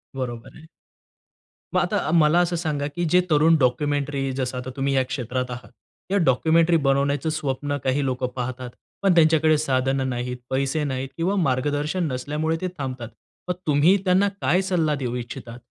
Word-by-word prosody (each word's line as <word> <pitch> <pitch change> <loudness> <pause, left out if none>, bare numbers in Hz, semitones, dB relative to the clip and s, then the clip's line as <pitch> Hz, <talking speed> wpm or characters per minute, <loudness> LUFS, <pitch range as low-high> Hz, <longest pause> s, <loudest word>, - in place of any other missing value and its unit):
बरोबर 120 -3 -6
आहे. 160 - -15 1.1
मग, - - +5
आता - - -1
मला 160 +1 +5
असं 175 0 +1
सांगा 150 -4 -2
की 175 0 -1
जे 180 +3 +5
तरुण 160 +1 +5
डॉक्युमेंटरी, 140 +1 0
जसं 130 -1 -3
आता 125 +1 -5
तुम्ही 140 0 0
या 130 - +3
क्षेत्रात 125 -1 -3
आहात, 125 +1 -8 0.4
या 200 - +3
डॉक्युमेंटरी 165 +2 +3
बनवण्याचं 140 +2 +1
स्वप्न 145 -2 -2
काही 135 +2 +1
लोक 130 -1 -2
पाहतात, 125 0 -4 0.3
पण 195 -2 +4
त्यांच्याकडे 160 -1 +4
साधनं 135 -2 0
नाहीत, 125 0 -3
पैसे 135 +3 0
नाहीत 135 -2 -3
किंवा 180 +4 0
मार्गदर्शन 145 +5 -1
नसल्यामुळे 150 +5 -2
ते 185 - -1
थांबतात. 130 -4 -5 0.4
मग - - +2
तुम्ही 150 +6 +4
त्यांना 190 +2 +4
काय 180 - +2
सल्ला 170 -5 0
देऊ 125 -3 -3
इच्छिता? 120 -1 -7
145 Hz, 160 wpm, -23 LUFS, 130-160 Hz, 1.1 s, मग